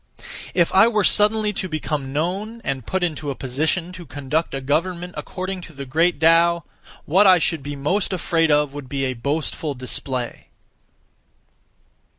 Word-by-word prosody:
If 170 -2 +2
I 195 +4 +7
were 215 -3 +1
suddenly 210 +1 +4
to 185 -1 -3
become 150 -3 -3
known, 190 +10 -2
and 130 -4 -3
(put 190 -1 -1
into 155 -4 -2
a 140 - -3
position 155 +8 -1
to) 180 -1 -9
conduct 145 +1 -2
(a - - -2
government) 170 +6 -1
according 185 0 -5
to - - -14
the 140 -1 -7
Great 165 +6 +1
Tao, 170 +1 +4 0.4
what 195 +7 +5
I 185 -1 +8
should 165 -2 0
be 145 +1 -5
most 165 +10 0
afraid 165 -3 +1
of 150 -1 +2
would 145 -3 -8
be 135 0 -1
a 130 - -1
boastful 145 +3 -2
display. 125 -1 -4
160 Hz, 165 wpm, -22 LUFS, 140-185 Hz, 0.4 s, I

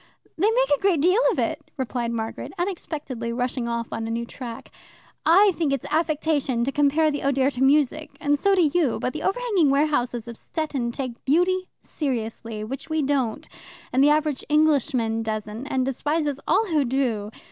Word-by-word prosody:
"They 395 +6 +2
make - - +2
a - - -12
great 385 -5 +3
deal 365 - +4
of - - -3
it," - - -2
replied 245 -2 -2
Margaret, 225 -1 -4
unexpectedly 305 -10 -4
rushing 245 0 -2
off 235 0 -3
on 225 0 -3
a - - -4
new 230 +1 -2
track. 235 -1 -8 0.6
"I 390 +5 +6
think 315 -4 0
it's 275 - -2
affectation 305 -5 +1
to 270 - 0
compare 295 +2 +3
the 290 - -3
Oder 275 0 +2
to 250 - -6
music, 290 +2 +3
and 290 0 +1
so 395 +3 +3
do 365 - +4
you, 300 -4 +2
but 250 - -2
the 305 - -5
overhanging 390 - +1
warehouses 250 -5 +1
of 235 -1 -8
Stettin 280 -7 -3
take 255 -2 -6
beauty 365 +6 +2
seriously, 230 -5 -4
which 260 +8 -6
we 315 -1 0
don't, 265 -5 -1 0.5
and 260 +2 +4
the 290 - +6
average 300 -2 +1
Englishman 275 -7 +2
doesn't, 215 +3 -4
and 260 -2 0
despises 290 +2 -1
all 450 - +3
who 315 -7 +1
do. 240 -5 -1
275 Hz, 180 wpm, -24 LUFS, 240-315 Hz, 0.6 s, I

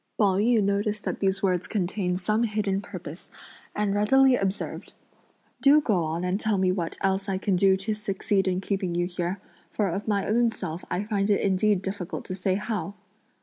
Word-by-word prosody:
Pao 195 -3 +3
yü 220 +1 +3
noticed 205 +1 0
that - - -3
these 195 0 0
words 180 -2 +1
contained 180 -2 -1
some 215 +4 +1
hidden 210 -3 0
purpose, - - -9 0.5
and 205 -1 0
readily 260 +6 +5
observed: 195 -3 -3 0.7
"Do 285 +2 +7
go 200 - +1
on 165 +3 -3
and 180 +2 0
tell 215 -2 0
me 185 -1 +2
what 175 -3 -3
else 195 +1 0
I 190 - 0
can 195 0 0
do 190 +1 +4
to 205 +3 -2
succeed 200 -2 -1
in 185 0 0
keeping 190 -3 -2
you 175 0 +1
here, 175 +1 -3 0.3
for 205 -3 -1
of 195 +6 -4
my 200 -2 +1
own 235 +2 +3
self 180 -6 -6
I 190 - -1
find 205 -1 -1
it 205 - +3
indeed 195 0 +2
difficult 190 -2 -5
to 185 - -5
say 185 0 0
how!" 205 -3 -3
195 Hz, 190 wpm, -26 LUFS, 185-210 Hz, 0.7 s, Do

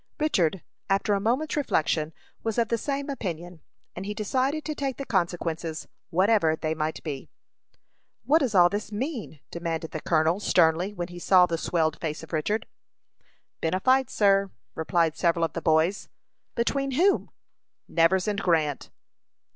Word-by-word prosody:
Richard, 190 - +1 0.3
after 195 +1 +2
a 200 - +2
moment's 250 +9 0
reflection, 160 - 0 0.3
was 225 0 -2
of 230 -2 +2
the 230 - +1
same 280 +2 -3
opinion, 175 - -5 0.3
and 180 - -5
he 210 +1 -4
decided 260 +8 -1
to 310 - -2
take 275 -3 -3
the 275 - -5
consequences, 170 -4 -2 0.2
whatever 185 -2 +3
they 155 0 -2
might 155 0 -3
be. 140 -4 -6 1.0
"What 310 +3 +5
does 250 -9 -1
all 175 -1 +7
this 205 +3 -4
mean?" 225 - -4
demanded 165 -1 -4
the 155 - -5
colonel, 160 +3 +2
sternly, 175 -1 +3
when 175 -3 -5
he 175 0 -9
saw 180 0 +5
the 170 - -2
swelled 160 -1 0
face 155 -1 -3
of 160 - -12
Richard. 210 +8 0 0.9
"Been 165 +2 0
a - - 0
fight, 260 +3 +3
sir," 195 -1 +3 0.2
replied 160 0 +1
several 170 -1 +2
of 165 - -6
the 165 - -4
boys. 160 +5 +1 0.5
"Between 275 +3 0
whom?" 370 +9 +2 0.6
"Nevers 175 +4 +3
and 205 -1 -1
Grant." 155 -5 0
180 Hz, 160 wpm, -26 LUFS, 160-225 Hz, 1.0 s, all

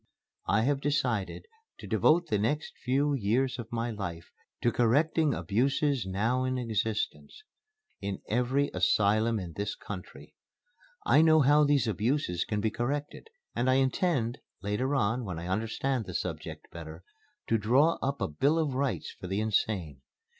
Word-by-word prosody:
I 110 +2 +3
have 140 +2 +1
decided 130 - -1 0.3
to - - -10
devote 170 +3 +3
the 105 -8 0
next 145 +9 -1
few 140 +3 +1
years 125 +2 0
of 115 -1 -7
my 115 0 -2
life 90 -6 -6 0.3
to 120 - +3
correcting 145 +5 +2
abuses 135 +1 0
now 115 +7 0
in 130 0 -1
existence 115 - -2 0.6
in 100 -1 -3
every 125 +5 +1
asylum 105 +5 +2
in 85 -3 -7
this 100 +3 -3
country. 95 -3 -9 0.7
I 155 - +5
know 160 -1 +6
how 145 +2 +5
these 140 -5 +2
abuses 110 - 0
can 105 -1 -2
be 110 0 0
corrected 145 - -3 0.3
and 125 +2 +1
I 130 - +4
intend 135 - +1 0.2
later 110 +8 0
on, 120 0 +1
when 90 -6 -5
I 85 - -6
understand 115 +5 -1
the 90 - -6
subject 80 -2 -5
better 80 0 -9 0.4
to 115 - +1
draw 130 +10 +3
up 140 +1 -2
a - - +1
Bill 140 - +1
of 155 -4 0
Rights 135 +1 -1
for 90 - -9
the 95 +2 -1
Insane. 95 -9 -1
120 Hz, 155 wpm, -29 LUFS, 100-140 Hz, 0.7 s, know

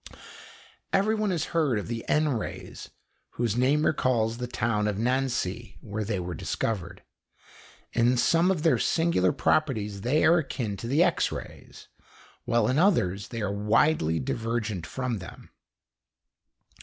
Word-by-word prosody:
Everyone 215 +2 +1
has 170 -5 -1
heard 150 -8 +2
of 105 - -4
the 115 -1 -4
N 155 0 +3
rays, 120 -6 -5 0.4
whose 115 -3 -1
name 140 +5 +2
recalls 115 -5 +1
the 125 - -3
town 110 -3 0
of 105 -2 -1
Nancy, 120 -3 -1
where 105 0 -4
they 100 -2 -2
were 90 0 -4
discovered. 95 -5 -3 0.9
In 120 +2 +3
some 165 +8 +3
of 175 -5 0
their 165 - +3
singular 165 - +2
properties 105 -10 0
they 130 +8 +2
are 170 +2 +5
akin 125 -8 -3
to 115 - -6
the 145 +7 +3
X 175 -2 +1
rays, - - -9 0.6
while 115 -2 +2
in 130 +4 +1
others 100 - +2
they 115 -3 -5
are 100 -1 -1
widely 105 - +2
divergent 110 - -3
from 125 -5 -3
them. 90 - -12
120 Hz, 145 wpm, -27 LUFS, 105-150 Hz, 0.9 s, are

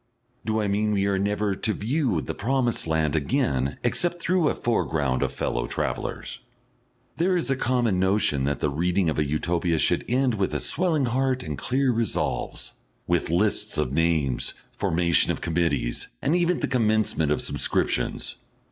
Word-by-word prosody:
Do 110 0 0
I 105 - 0
mean 105 +1 +1
we 100 -1 +1
are 100 -1 +1
never 105 +1 0
to 110 +3 -1
view 120 - 0
the - - -4
promised 120 -2 0
land 80 -1 +1
again 70 -2 0
except 175 +8 +1
through 175 -2 +2
a - - -1
foreground 75 - 0
of - - 0
fellow - - -2
travellers? - - -3 0.8
There 180 +2 +2
is 165 -5 -1
a - - +3
common 120 -7 +1
notion 95 -8 +2
that 70 +1 -1
the 75 - +1
reading 90 +3 +1
of 80 - -2
a - - +3
Utopia 85 +3 0
should - - +2
end 130 0 +2
with 100 -3 -1
a - - +1
swelling 165 -6 +1
heart 130 +1 0
and 75 -2 -4
clear 130 - +1
resolves, 115 -3 -2 0.3
with 85 -2 0
lists 100 +5 +1
of 65 - 0
names, 80 -5 +1 0.2
formation 85 0 +1
of - - -3
committees, 80 -7 -1
and 155 - +1
even 175 0 +1
the - - 0
commencement 110 - +1
of 75 - +1
subscriptions. - - -1
100 Hz, 165 wpm, -25 LUFS, 80-125 Hz, 0.8 s, a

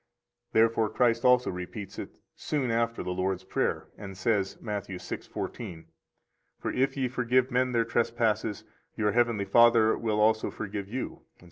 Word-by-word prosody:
Therefore 115 -1 +3
Christ 115 0 +2
also 125 0 +4
repeats 95 +2 -7
it - - -5 0.3
soon 135 -5 -1
after 115 0 0
the 90 - -3
Lord's 95 0 -1
Prayer, - - -1
and 95 -2 -8
says, 100 -1 0
Matt. 105 -2 -4
6:14: 90 -1 -6 0.7
For - - -2
if 135 +2 +1
ye 130 -2 +1
forgive 125 +1 +1
men 125 +1 +2
their 115 -1 +2
trespasses, 115 -3 0 0.3
your 105 -1 +2
heavenly 115 -4 +2
Father 115 +1 +5
will 110 -2 -1
also 110 +1 +3
forgive 100 -2 -5
you, 125 +5 -5
etc. - - -38
115 Hz, 150 wpm, -28 LUFS, 100-120 Hz, 0.7 s, Father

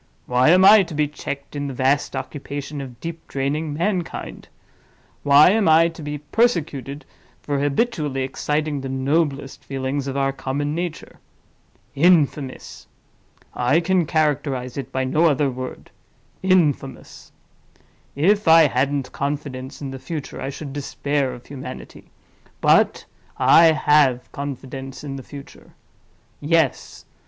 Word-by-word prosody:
Why 125 +3 +3
am 185 +3 +6
I 210 +1 +9
to 170 -4 -5
be 150 0 +1
checked 140 -1 -7
in 145 0 -3
the 135 - -6
vast 135 +2 +1
occupation 140 +1 -6
of 125 -3 -10
deep 165 +2 -7
draining 145 +3 -2
mankind? 175 +3 -3 0.7
Why 145 +4 +6
am 205 -4 +2
I 165 +1 +5
to 165 -1 -11
be 150 0 -4
persecuted 150 - -1 0.4
for 145 -1 -1
habitually 145 - -1
exciting 150 +2 -2
the 135 - -5
noblest 135 +1 -1
feelings 135 +1 -3
of 135 0 -3
our 135 0 +1
common 145 +2 -3
nature? 170 0 -5 0.7
Infamous!—I 145 -3 -1
can 175 -1 +1
characterize 140 -5 -1
it 135 -1 -6
by 130 0 -1
no 150 +6 +2
other 145 -1 +1
word—infamous! 140 +3 -3 0.8
If 200 +7 +2
I 165 0 +8
hadn't 135 0 -1
confidence 140 -1 -5
in 135 - -5
the 135 - -7
future, 155 0 -6
I 135 - -3
should 140 0 -7
despair 145 -1 -2
of 125 -1 -11
humanity—but 130 -2 -2 0.3
I 165 - +6
have 150 -5 +3
confidence 135 -1 -7
in 140 -2 -5
the - - -7
future. 140 +1 -13 0.6
Yes! 155 -2 0
145 Hz, 125 wpm, -22 LUFS, 135-155 Hz, 0.8 s, I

